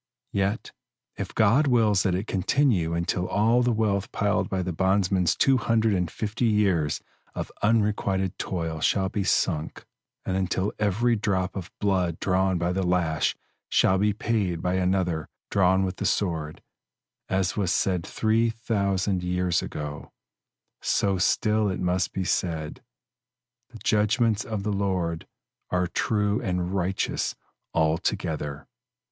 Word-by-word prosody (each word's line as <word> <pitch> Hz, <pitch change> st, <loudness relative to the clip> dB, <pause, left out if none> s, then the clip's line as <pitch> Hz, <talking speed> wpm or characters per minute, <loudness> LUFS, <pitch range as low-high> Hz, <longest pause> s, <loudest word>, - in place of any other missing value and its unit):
Yet, 100 Hz, +2 st, -1 dB, 0.4 s
if -, -, -6 dB
God 115 Hz, +8 st, +4 dB
wills 110 Hz, -6 st, +3 dB
that 95 Hz, -3 st, +1 dB
it 95 Hz, +3 st, -2 dB
continue 95 Hz, -, +1 dB
until 90 Hz, +2 st, -1 dB
all 115 Hz, +4 st, +3 dB
the 125 Hz, 0 st, +2 dB
wealth 105 Hz, -3 st, 0 dB
piled 105 Hz, 0 st, 0 dB
by 95 Hz, -1 st, -1 dB
the 90 Hz, -1 st, -3 dB
bondsman's 95 Hz, -1 st, +2 dB
two 135 Hz, -1 st, +4 dB
hundred 115 Hz, -2 st, +2 dB
and 90 Hz, -3 st, 0 dB
fifty 110 Hz, +5 st, -2 dB
years 95 Hz, -9 st, +1 dB, 0.3 s
of -, -, -4 dB
unrequited 105 Hz, -4 st, +1 dB
toil 80 Hz, -3 st, -3 dB
shall 95 Hz, +3 st, +2 dB
be 100 Hz, -1 st, -2 dB
sunk, 80 Hz, -3 st, 0 dB, 0.4 s
and 95 Hz, -, -1 dB
until 95 Hz, +1 st, -1 dB
every 110 Hz, +4 st, +2 dB
drop 100 Hz, -3 st, -1 dB
of 95 Hz, -3 st, -5 dB
blood 90 Hz, -5 st, 0 dB
drawn 95 Hz, 0 st, +1 dB
by 85 Hz, +1 st, 0 dB
the 95 Hz, -, 0 dB
lash 90 Hz, -3 st, +1 dB, 0.3 s
shall 95 Hz, 0 st, +3 dB
be 105 Hz, +1 st, +3 dB
paid 100 Hz, -5 st, -1 dB
by 90 Hz, +2 st, -1 dB
another 90 Hz, -3 st, 0 dB, 0.2 s
drawn 95 Hz, 0 st, +3 dB
with 90 Hz, 0 st, -4 dB
the -, -, -1 dB
sword, 80 Hz, -6 st, -2 dB, 0.7 s
as 95 Hz, -1 st, 0 dB
was 95 Hz, -4 st, 0 dB
said 90 Hz, -3 st, +1 dB
three 110 Hz, +4 st, +1 dB
thousand 100 Hz, -4 st, -1 dB
years 90 Hz, -1 st, 0 dB
ago, 75 Hz, 0 st, -6 dB, 0.7 s
so 100 Hz, -2 st, +1 dB
still 105 Hz, +3 st, +2 dB
it 95 Hz, -, -3 dB
must 90 Hz, 0 st, 0 dB
be 95 Hz, -, -2 dB
said, 80 Hz, -4 st, -2 dB, 0.9 s
"The 120 Hz, -, -11 dB
judgments 110 Hz, +1 st, +1 dB
of 110 Hz, -3 st, -3 dB
the 105 Hz, 0 st, -1 dB
Lord 95 Hz, -4 st, -1 dB, 0.4 s
are 90 Hz, 0 st, +1 dB
true 105 Hz, +3 st, 0 dB
and 90 Hz, 0 st, -2 dB
righteous 95 Hz, 0 st, -1 dB, 0.4 s
altogether." 80 Hz, -2 st, -1 dB
95 Hz, 140 wpm, -26 LUFS, 90-105 Hz, 0.9 s, God